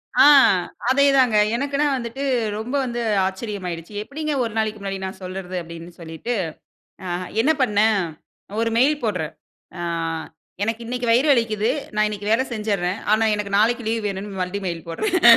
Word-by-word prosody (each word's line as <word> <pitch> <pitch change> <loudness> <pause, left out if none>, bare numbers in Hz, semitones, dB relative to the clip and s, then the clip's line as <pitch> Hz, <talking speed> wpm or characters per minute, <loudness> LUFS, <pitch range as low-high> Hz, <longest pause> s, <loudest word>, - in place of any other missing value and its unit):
ஆ, - - +7 0.7
அதே 280 +2 +5
தாங்க. 250 -5 +4 0.2
எனக்குன்னு 280 +3 0
வந்துட்டு 245 +3 -5 0.3
ரொம்ப 240 +5 -4
வந்து 240 -1 -3 0.2
ஆச்சரியமாயிடுச்சு. 190 -3 -5
எப்பிடிங்க 305 +5 -3
ஒரு 225 -2 -3
நாளைக்கி 215 -1 0
முன்னாடி 195 -1 -4
நான் 190 - -7
சொல்றது 185 0 -5
அப்பிடின்னு 170 +1 -10
சொல்லிட்டு, 165 +9 -4 0.7
ஆ - - -4 0.3
என்ன 305 +6 +4
பண்ணேன் 210 -2 +3 0.6
ஒரு 230 0 +1
மெயில் 285 +3 +3
போட்றேன். 180 -8 -2 0.4
ஆ - - -5 0.8
"எனக்கு 225 +2 -2
இன்னக்கி 245 +1 -3
வயிறு 245 +6 +4
வலிக்கிது. 225 -3 +1 0.2
நான் 215 0 +3
இன்னக்கி 205 -1 -5
வேல 230 +4 +4
செஞ்சிர்றேன். 200 -4 -1 0.2
ஆனா 220 +1 +2
எனக்கு 200 -1 -1
நாளைக்கி 240 +3 +3
லீவ் 225 -1 -1
வேணுன்னு." 195 0 -5
மறுபடியும் 190 +2 -3
மெயில் 170 -2 -5
போட்றேன். 365 - 0
215 Hz, 150 wpm, -22 LUFS, 190-240 Hz, 0.8 s, ஆ